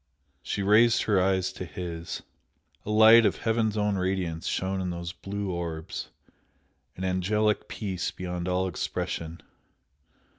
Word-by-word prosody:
She 100 - -3
raised 110 +4 +5
her 100 -4 +3
eyes 95 0 +1
to 95 - -6
his. 85 -1 -6 0.6
A - - -3
light 110 +2 +8
of - - +2
heaven's 110 -2 0
own 105 -1 +1
radiance 90 -3 -2
shone 95 0 -1
in 90 - -2
those 85 0 -4
blue 100 0 -4
orbs 85 -2 -5 0.9
an 95 - -5
angelic 105 +4 +1
peace 95 -4 -3
beyond 90 -1 -5
all 90 +1 +1
expression. 85 -1 -4
95 Hz, 135 wpm, -27 LUFS, 90-105 Hz, 0.9 s, light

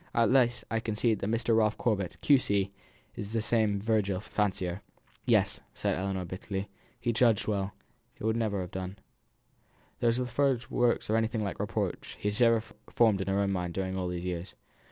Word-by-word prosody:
At 115 -1 +4
least 120 -2 +3
I 115 - +1
conclude 110 -1 0
that 100 - -2
Mr. 115 0 +2
Ralph 110 -1 +3
Corbet, 100 -6 -1
Q.C., 100 -9 +3 0.4
is 105 +2 -6
the 115 - +1
same 110 -3 +2
as - - -2
the - - -11
Virgil 105 -4 +1
fancier." 95 -3 -1 0.5
"Yes," - - +3 0.2
said - - 0
Ellinor, 95 -1 -2
bitterly; 95 +2 -5 0.3
"he 120 - 0
judged 115 -2 +3
well; 100 -2 -1 0.5
it - - -9
would 110 0 +2
never 110 -4 0
have 90 - -6
done." 95 +1 -5 1.0
They 120 - +2
were 115 - +5
the 125 +1 -1
first 125 0 0
words 120 -2 +2
of - - +3
anything 110 -1 +1
like 100 - -4
reproach - - -3
which 105 0 +1
she 115 - +2
ever 115 -1 +5 0.3
formed 110 -5 +3
in 95 - -3
her 100 +1 +2
own 100 -1 +1
mind 90 -2 -2
during 95 -1 -2
all 95 -1 -1
these 90 0 -4
years. 90 0 -4
105 Hz, 195 wpm, -30 LUFS, 95-115 Hz, 1.0 s, were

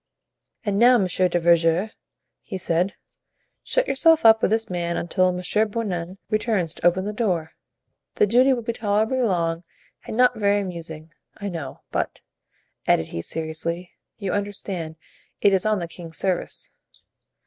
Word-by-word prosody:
"And 200 -1 0
now, 245 +1 +7
Monsieur 185 -2 +1
du 175 - +1
Verger," 170 +4 +3 0.5
he 190 - -6
said, 180 +1 0 0.7
"shut - - 0
yourself 325 +2 +4
up 220 0 +7
with - - +3
this 225 +1 +1
man 170 -1 -2
until 185 +1 +1
Monsieur 180 +4 +1
Bernouin 190 -5 -4
returns 215 -6 0
to - - +1
open 185 +2 +1
the 210 - -3
door. 180 -8 -1 0.6
The - - +4
duty 250 +6 +4
will 245 -3 0
be 235 - -2
tolerably 220 +4 0
long 170 -6 0 0.4
and 220 - -5
not 250 0 +5
very 205 0 +3
amusing, 165 -4 -7 0.3
I 200 -1 -4
know; 155 -7 -6
but," - - -2 0.7
added 80 - +2
he, 85 - -4
seriously, 165 - -4 0.3
"you 200 -3 -3
understand, 195 -5 -3 0.4
it 200 - +4
is 190 +2 +2
on 215 -1 +2
the 170 -3 -4
king's 165 -1 -9
service." 185 -3 -2
190 Hz, 155 wpm, -23 LUFS, 170-215 Hz, 0.7 s, now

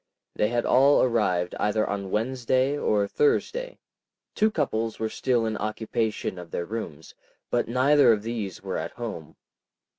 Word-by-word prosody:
They 105 - +1
had 120 +1 -1
all 135 +3 +5
arrived 95 -8 +1
either 105 +1 +1
on 100 -2 -3
Wednesday 130 +5 0
or 105 -8 +1
Thursday. 470 - 0 0.6
Two 215 - +3
couples 115 - -1
were 110 - -1
still 120 0 0
in 110 -1 -2
occupation 110 -2 -2
of 90 -1 -10
their 85 - -3
rooms, 85 -8 -7 0.4
but 120 - +1
neither 130 +3 +4
of 105 -2 +1
these 110 -6 -5
were 95 -1 -3
at 80 +1 -5
home. 110 -10 -7
115 Hz, 150 wpm, -26 LUFS, 105-130 Hz, 0.6 s, all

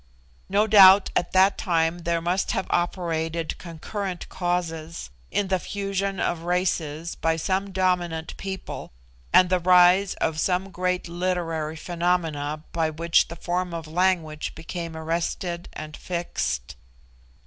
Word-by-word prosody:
No 205 +2 +3
doubt 195 -2 +8
at - - 0
that 190 +1 +4
time 165 -2 +1
there 170 0 -1
must 180 +3 0
have - - -1
operated 165 -2 -1
concurrent 180 +2 -5
causes, 170 -2 -3 0.2
in 200 -1 -1
the 190 -1 +2
fusion 195 0 -3
of 170 -1 -1
races 170 -3 -1
by 165 0 0
some 190 +4 -1
dominant 180 -3 0
people, 190 - -6 0.4
and 185 0 +6
the 185 - +3
rise 180 +2 +5
of 160 -1 -1
some 185 +3 0
great 180 0 -1
literary 170 -3 -2
phenomena 160 -3 -1
by 165 -1 0
which 165 +2 +2
the 170 - -8
form 175 +1 -2
of 165 -1 -5
language 160 -2 0
became 165 0 -6
arrested 170 +2 -3
and 155 -1 -7
fixed. 115 - -3
175 Hz, 130 wpm, -25 LUFS, 165-185 Hz, 0.4 s, doubt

